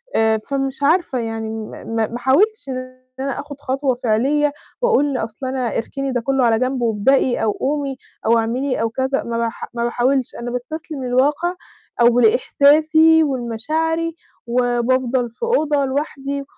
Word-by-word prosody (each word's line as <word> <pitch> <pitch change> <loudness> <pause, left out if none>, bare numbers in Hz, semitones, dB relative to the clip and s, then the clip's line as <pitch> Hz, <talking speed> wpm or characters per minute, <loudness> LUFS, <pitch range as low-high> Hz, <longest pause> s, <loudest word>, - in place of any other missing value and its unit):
آآ 220 0 +3
فمش 270 0 -2
عارفة 305 -4 +2
يعني 225 -1 -4
م-م 220 +1 -6
ما 225 +1 -1
حاولتش 360 - +2
إن 255 0 -6 0.2
أنا 275 +1 -2
آخد 285 -1 -8
خطوة 270 -1 0
فعليّة، 280 +6 +2 0.3
وأقول 290 - +2
أصل 220 +3 -5
أنا 255 -2 -2
اركني 275 +3 -3
ده 245 - -1
كله 270 +1 +1
على 225 -1 +3
جنب 255 0 -1
وابدئي 240 +3 +2
أو 215 - +2
قومي 275 +2 -2 0.3
أو 230 +1 +4
اعملي 245 +4 -1
أو 225 - +1
كذا، 265 +4 -1
ما 235 0 -3
بح 230 0 -3
ما 235 0 -2
باحاولش، 250 +2 0
أنا 240 0 -5
باستسلم 280 +3 -5
للواقع 290 +8 +1 0.5
أو 240 +1 +5
لإحساسي 310 +7 +5
ولمشاعري، 310 +6 -1 0.3
وبافضل 245 0 +1
في 230 - -12
أوضة 305 - +2
لوحدي، 280 0 -3
260 Hz, 150 wpm, -20 LUFS, 235-285 Hz, 0.5 s, أو